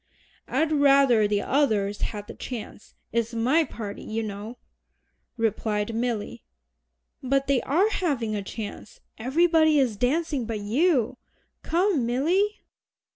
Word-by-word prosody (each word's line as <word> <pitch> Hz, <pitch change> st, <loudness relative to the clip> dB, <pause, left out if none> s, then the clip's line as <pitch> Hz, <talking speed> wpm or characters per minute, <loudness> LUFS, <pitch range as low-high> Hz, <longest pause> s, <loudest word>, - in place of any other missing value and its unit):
"I'd 315 Hz, -1 st, 0 dB
rather 275 Hz, -7 st, +5 dB
the 205 Hz, -1 st, 0 dB
others 215 Hz, -8 st, +1 dB
had 205 Hz, -2 st, -4 dB
the -, -, -9 dB
chance 230 Hz, -4 st, -8 dB, 0.2 s
it's 230 Hz, +1 st, -1 dB
my 260 Hz, +9 st, +3 dB
party, 210 Hz, -8 st, -7 dB
you 225 Hz, +1 st, -3 dB
know," 215 Hz, +3 st, -6 dB, 0.8 s
replied 215 Hz, -1 st, -1 dB
Milly. 225 Hz, -, -3 dB, 0.8 s
"But 275 Hz, +1 st, +1 dB
they 275 Hz, -3 st, +2 dB
are 345 Hz, +10 st, +2 dB
having 270 Hz, -, -1 dB
a 205 Hz, -, -2 dB
chance. 210 Hz, +1 st, -8 dB, 0.2 s
Everybody 315 Hz, +4 st, +3 dB
is 245 Hz, -6 st, +1 dB
dancing 275 Hz, 0 st, 0 dB
but 225 Hz, -2 st, -3 dB
you. 255 Hz, -, +1 dB, 0.4 s
Come, 340 Hz, -, +1 dB
Milly." 360 Hz, -, +1 dB
245 Hz, 125 wpm, -25 LUFS, 215-295 Hz, 0.8 s, rather